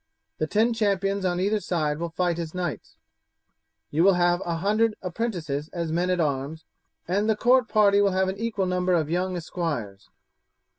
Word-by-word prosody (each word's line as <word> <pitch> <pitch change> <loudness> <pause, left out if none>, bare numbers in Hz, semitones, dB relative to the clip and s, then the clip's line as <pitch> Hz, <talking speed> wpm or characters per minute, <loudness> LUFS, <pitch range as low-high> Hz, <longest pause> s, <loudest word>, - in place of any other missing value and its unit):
The 155 - 0
ten 225 +7 +2
champions 200 -2 0
on 180 -1 0
either 205 +3 +1
side 155 -6 -1
will 170 0 -3
fight 175 0 -1
as 165 0 -5
knights; 175 -4 -4 1.0
you 160 +3 +2
will 195 0 +5
have 175 +1 +2
a 170 - -2
hundred 210 +5 +1
apprentices 170 -8 -3
as 170 -2 -3
men 175 +3 0
at 180 -1 +1
arms, 145 +1 -2 0.4
and 200 +5 0
the 220 - +3
court 250 +2 +3
party 205 -2 +4
will 200 - +4
have 190 0 +1
an 190 +1 -4
equal 220 -4 -1
number 180 0 0
of 160 -2 0
young 180 +1 -1
esquires. 150 - -4
180 Hz, 180 wpm, -25 LUFS, 165-200 Hz, 1.0 s, will